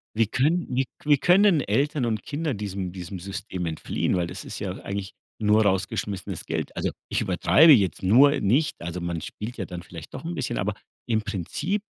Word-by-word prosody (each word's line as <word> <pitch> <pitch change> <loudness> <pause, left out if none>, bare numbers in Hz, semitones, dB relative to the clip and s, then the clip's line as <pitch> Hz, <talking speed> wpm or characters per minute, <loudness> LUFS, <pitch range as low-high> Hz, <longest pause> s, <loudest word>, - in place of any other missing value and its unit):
Wie 110 -1 +3
können 145 - +1
wie 135 +1 +2 0.2
wie 145 -1 +5
können 180 +1 +5
Eltern 140 +5 0
und 110 -2 -1
Kinder 150 0 -2
diesem 100 -3 -4
diesem 90 +1 -7
System 95 0 -5
entfliehen, 80 +3 -1
weil 90 -1 0
das - - -7
ist - - -7
ja 95 - -3
eigentlich 100 -1 -4 0.3
nur 105 +1 +4
rausgeschmissenes 95 0 -2
Geld. - - -3
Also, - - -1 0.2
ich - - 0
übertreibe 160 +2 +5
jetzt 100 -11 +4
nur 135 +10 +6
nicht 130 +10 +2
also 85 +1 -4
man 85 -1 -3
spielt 115 +9 -7
ja 95 - -3
dann 90 -1 -7
vielleicht 85 -2 -11
doch - - -7
'n 170 - -3
bisschen, 135 -7 -2
aber 105 +2 -1 0.3
im 110 -2 +1
Prinzip 110 - -3
105 Hz, 190 wpm, -25 LUFS, 95-140 Hz, 0.3 s, nur